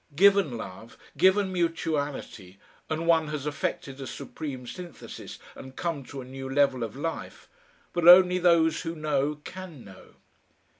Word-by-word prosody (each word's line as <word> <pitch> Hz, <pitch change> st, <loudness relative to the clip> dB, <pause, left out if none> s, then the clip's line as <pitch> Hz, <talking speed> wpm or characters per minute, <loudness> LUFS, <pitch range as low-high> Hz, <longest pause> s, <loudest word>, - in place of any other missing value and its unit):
Given 195 Hz, -7 st, +4 dB
love 110 Hz, +2 st, -9 dB, 0.2 s
given 190 Hz, +4 st, +3 dB
mutuality, 150 Hz, -, -2 dB, 0.3 s
and 160 Hz, +1 st, -2 dB
one 165 Hz, -2 st, +3 dB
has 150 Hz, -2 st, -4 dB
effected 140 Hz, -2 st, -3 dB
a 135 Hz, -, -5 dB
supreme 135 Hz, -5 st, -7 dB
synthesis 175 Hz, +7 st, -9 dB, 0.2 s
and 130 Hz, 0 st, -11 dB
come 165 Hz, -5 st, -3 dB
to 135 Hz, +1 st, -8 dB
a -, -, -9 dB
new 135 Hz, +1 st, -7 dB
level 135 Hz, -2 st, +2 dB
of 110 Hz, 0 st, -5 dB
life 160 Hz, +4 st, -5 dB, 0.5 s
but 175 Hz, -1 st, +1 dB
only 180 Hz, 0 st, +9 dB
those 165 Hz, -2 st, +3 dB
who 165 Hz, -1 st, -4 dB
know 150 Hz, -1 st, 0 dB
can 180 Hz, -8 st, -9 dB
know. 95 Hz, -2 st, -15 dB
150 Hz, 145 wpm, -27 LUFS, 135-170 Hz, 0.5 s, only